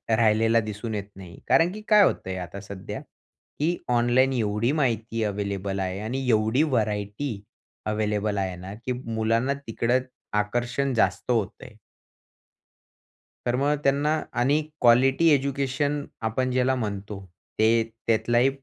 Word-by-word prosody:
राहिलेला 115 +1 +3
दिसून 110 +1 -4
येत 100 - -2
नाही. 90 -3 -11
कारण 170 +2 +4
की 215 - -8
काय 210 -2 +7
होतं 95 - 0
आहे 95 - -3
आता 90 +3 -7
सध्या, 100 -1 -7 0.6
की 170 +4 +1
ऑनलाईन 125 +2 +3
एवढी 110 +1 0
माहिती 115 -6 0
अव्हेलेबल 100 -1 -2
आहे 95 0 -2
आणि 125 +5 -3
एवढी 110 +5 +3
व्हरायटी 105 -3 -1 0.4
अव्हेलेबल 105 -1 -1
आहे 95 -2 -1
ना 90 +2 -8
की 130 - -1
मुलांना 115 +4 +1
तिकडं 120 +2 +1 0.4
आकर्षण 120 +5 -1
जास्त 120 +1 +1
होतं 110 -6 -1
आहे. - - -13 1.7
तर 120 0 +1
मग 140 +3 +2
त्यांना 150 +3 +2 0.2
आणि 145 +5 +3 0.2
क्वालिटी 130 +6 +5
एज्युकेशन 140 +1 0 0.2
आपण 130 +3 -1
ज्याला 130 +1 +2
म्हणतो, 105 -3 -4 0.4
ते 115 +1 +4 0.2
त्यातलाही 120 +3 +3
115 Hz, 130 wpm, -25 LUFS, 105-130 Hz, 1.7 s, काय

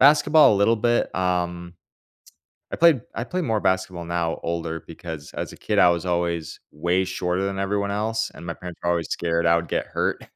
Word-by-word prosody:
Basketball 150 -1 +6
a - - +1
little 100 +3 +4
bit, 120 +2 +1
um, 90 -1 -1 1.0
I - - -3
played 165 -7 +5
I 115 - -3
play 185 +7 -2
more 115 -9 0
basketball 95 -3 -1
now 85 -1 -2
older 85 -1 -3
because, 80 -2 -8
as - - -4
a - - -12
kid, - - -2
I 90 - +7
was 85 +1 0
always 85 -2 -2
way 85 +4 0
shorter 90 0 -2
than 95 0 -2
everyone 100 +1 -1
else, 110 +2 -1
and - - -11
my 85 - -3
parents 90 0 -9
were 85 - -1
always 85 -1 -1
scared 85 0 0
I 85 0 +5
would 85 0 -3
get - - -2
hurt, - - -2
90 Hz, 205 wpm, -24 LUFS, 85-105 Hz, 1.0 s, I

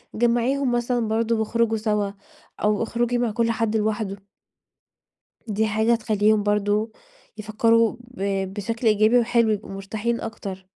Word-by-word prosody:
جمعيهم 240 +3 +1
مثلًا 240 -1 0
برضه 225 +1 0
واخرجوا 225 0 +1
سوا، 210 -2 -1 0.5
أو 210 +1 +2
اخرجي 240 +1 -1
مع 240 -2 0
كل 230 +1 +1
حد 225 -2 -1
لوحده. 210 -2 -2 1.3
دي 215 +1 0
حاجة 220 +2 +1
هتخليهم 215 -2 +2
برضه 210 +1 0 0.5
يفكروا 225 +1 +2
ب 195 -5 -3
بشكل 225 +3 -3
إيجابي 215 +3 +4
وحلو، 235 -1 +2
يبقوا 210 -2 -3
مرتاحين 210 +4 -3
أكتر. 195 -4 -7
220 Hz, 130 wpm, -23 LUFS, 210-235 Hz, 1.3 s, إيجابي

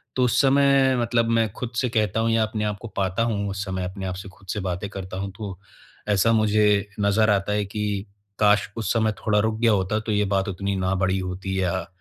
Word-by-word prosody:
तो 130 - +2
उस 120 - +2
समय 135 -1 +4
मतलब 115 0 +1
मैं 115 -1 +3
खुद 125 -1 -5
से 125 -1 +1
कहता 110 -1 0
हूँ 115 0 +1
या 115 -1 +3
अपने 110 0 -2
आपको 105 +2 -4
पाता 95 +3 0
हूँ, 100 -3 -1
उस 100 0 -3
समय, 95 -1 -3
अपने 95 +1 -6
आप 90 - -3
से 95 +1 -8
खुद 95 +1 -20
से 105 - -3
बातें 95 +1 -3
करता 95 -1 -7
हूँ 100 0 -4
तो, 100 -4 -6 0.5
ऐसा 105 +3 +3
मुझे 105 -1 +3
नज़र 105 +2 +3
आता 100 0 +1
है 105 -1 0
कि 100 0 -3 0.3
काश, 105 -1 +4
उस 110 - -1
समय 110 -2 +2
थोड़ा 105 -1 +3
रुक 110 +1 0
गया 115 -1 +4
होता, 100 +1 +1
तो 110 0 -4
ये 105 0 +2
बात 95 +1 0
उतनी 100 +1 -2
ना 95 0 0
बढ़ी 95 0 +1
होती 95 +1 -3
या 95 -1 -1
105 Hz, 230 wpm, -24 LUFS, 95-110 Hz, 0.5 s, समय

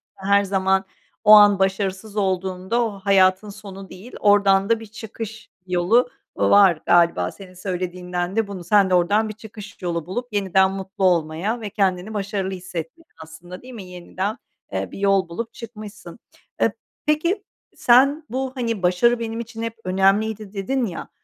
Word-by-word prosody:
her 200 +1 +2
zaman 190 0 +1 0.4
o 210 - +6
an 205 -2 +8
başarısız 195 +2 -1
olduğunda 190 +3 -1
o 225 - -2
hayatın 190 +1 +3
sonu 195 -2 -10
değil, 190 +7 -12
oradan 200 -1 +4
da 230 -1 +3
bir 225 - -9
çıkış 220 0 -9 0.2
yolu 185 +8 +2 0.3
var 195 -6 +4
galiba 170 - +3
senin 190 -2 -13
söylediğinden 180 0 -4
de 225 -2 +1
bunu 195 -3 -7
Sen 195 +2 +3
de - - 0
oradan 205 +5 +2
bir - - -5
çıkış 215 -1 -12
yolu 170 -3 -3
bulup 245 +8 -4
yeniden 190 -1 +2
mutlu 195 0 -6
olmaya 175 +6 0
ve 210 - -5
kendini 190 0 -1
başarılı 200 -2 -3
hissettin 180 - -7 0.2
aslında, 170 +3 -11
değil 255 0 -12
mi? 220 -5 -8
Yeniden, 185 +4 -5 0.4
eee, - - -3
bir - - -9
yol 195 -2 +2
bulup 230 +7 -5
çıkmışsın. 210 -5 -10 0.4
Eee, - - +3 0.3
peki, 335 +7 0 0.3
sen 275 +6 +4
bu, 260 +2 -3
hani, 230 -6 -3
başarı 210 +7 +3
benim 230 0 -4
için 230 -1 -7
hep 230 0 -4
önemliydi 195 +3 +1
dedin 240 +6 -1
ya, 180 -6 -6
195 Hz, 160 wpm, -22 LUFS, 185-220 Hz, 0.4 s, an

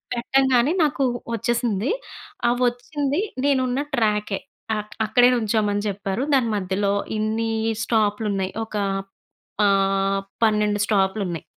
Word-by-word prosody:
పెట్టంగానే 265 +2 +2
నాకు 280 -2 +1 0.3
వచ్చేసింది. 235 - 0 0.6
ఆ - - +5 0.2
వచ్చింది 285 +6 -1 0.2
నేను 275 -2 +3
ఉన్న 255 +3 -1 0.2
ట్రాకె 210 -3 +1 0.4
అక్ 210 0 -6
అక్కడే 245 +3 +5
నిల్చోమని 210 -2 0
చెప్పారు. 195 +3 -3
దాని 255 -4 +3
మధ్యలో 200 +1 0 0.2
ఇన్ని 220 +1 -1 0.3
స్టాపులున్నాయి. 210 -3 0
ఒక 220 - -17 0.9
ఆహ్, 195 0 +2 0.2
12 210 -1 +2
స్టాపులున్నాయి. 190 -5 0
215 Hz, 105 wpm, -23 LUFS, 200-240 Hz, 0.9 s, ఆ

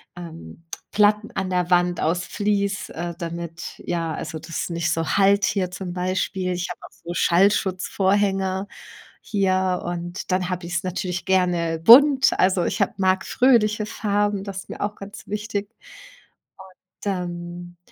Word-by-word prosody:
ähm, 165 - -10 0.3
Platten 210 +1 +3
an 190 -1 -3
der 180 -1 0
Wand 175 -1 +2
aus 170 +2 0
Fleece, 205 0 -1
äh, 170 +1 -5
damit 170 -1 -6
ja, 165 -2 -2
also, 160 - -5
das 165 - -13
ist - - -4
nicht 170 -1 -1
so 165 0 -1
hallt 200 +1 +4
hier 185 -3 0
zum 180 0 -6
Beispiel. 185 0 -1
Ich 175 0 -3
habe 180 - -7
auch - - -28
so 170 +1 -8
Schallschutzvorhänge 190 +1 +1 0.5
hier 185 -3 0
und 175 +2 -5
dann 185 0 0
habe 180 -1 -3
ich 175 0 -5
es 170 - 0
natürlich 180 -1 -3
gerne 175 -3 +1
bunt. 270 - +7
Also, 185 -1 +3
ich - - -1
habe 200 - +1
mag 190 0 +1
fröhliche 215 -5 +3
Farben, 205 -2 -1
das 195 -1 -5
ist - - -11
mir - - -7
auch 205 0 -2
ganz 200 +1 -11
wichtig. 210 0 -3
Und - - -20 0.6
dann 175 -2 -5
185 Hz, 155 wpm, -23 LUFS, 175-200 Hz, 0.6 s, bunt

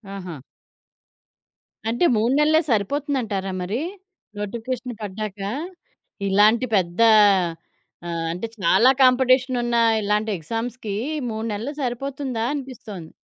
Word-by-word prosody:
ఆహా! 180 -4 -7 1.5
అంటే 240 +9 +1
3 230 +4 +2
నెల్లే 310 +2 +4
సరిపోతుందంటారా 225 -4 -1
మరీ? 205 +8 -2 0.6
నోటిఫికేషన్ 235 +4 -4
పడ్డాక? 205 0 -5 0.9
ఇలాంటి 210 +5 +4
పెద్ద 175 +1 -2 1.1
ఆహ్, 165 -1 -3
అంటే, 180 +7 -4
చాలా 220 +5 +4
కాంపిటీషనున్న 255 -1 +3 0.3
ఇలాంటి 210 +1 0
ఎగ్జామ్స్‌కి 225 +5 -4 0.4
3 220 0 -4
నెల్లు 225 +7 -4
సరిపోతుందా 260 -1 -3
అనిపిస్తోంది. 225 - -7
225 Hz, 90 wpm, -23 LUFS, 200-255 Hz, 1.5 s, నెల్లే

